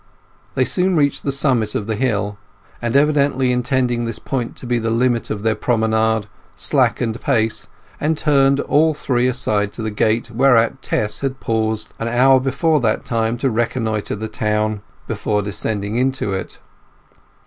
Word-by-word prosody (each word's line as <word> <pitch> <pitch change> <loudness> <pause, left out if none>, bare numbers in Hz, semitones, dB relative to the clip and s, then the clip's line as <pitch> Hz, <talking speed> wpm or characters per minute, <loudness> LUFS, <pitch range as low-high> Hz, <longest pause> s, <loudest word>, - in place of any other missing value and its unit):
They 130 - +2
soon 180 +9 +1
reached 145 -3 +2
the 140 - -1
summit 130 -6 0
of 105 - -1
the 110 0 -2
hill, 105 -4 -1 0.4
and, 120 +1 -2
evidently 140 -3 +3
intending 125 -1 0
this 115 -2 -3
point 125 -4 -3
to - - -8
be 120 -1 0
the 115 0 -2
limit 120 +1 +1
of 105 -1 -4
their 110 -1 +2
promenade, 110 -1 +1 0.3
slackened 115 -1 0
pace 110 -1 0 0.3
and 155 +1 0
turned 140 -3 +3
all 155 +1 +2
three 125 -3 0
aside 105 -5 0
to 115 - -6
the 110 - -2
gate 110 +2 0
whereat 125 +1 +3
Tess 105 -4 -1
had 135 -1 -3
paused 110 -1 -1
an 115 - -2
hour 130 +3 +5
before 140 +4 +1
that 115 -4 0
time 115 0 0
to 130 +1 0
reconnoitre 115 -2 -1
the 110 +2 -5
town 105 -1 -1 0.3
before 105 -1 -1
descending 105 +1 -3
into 130 -5 0
it. 95 - -4
120 Hz, 160 wpm, -19 LUFS, 110-135 Hz, 0.4 s, hour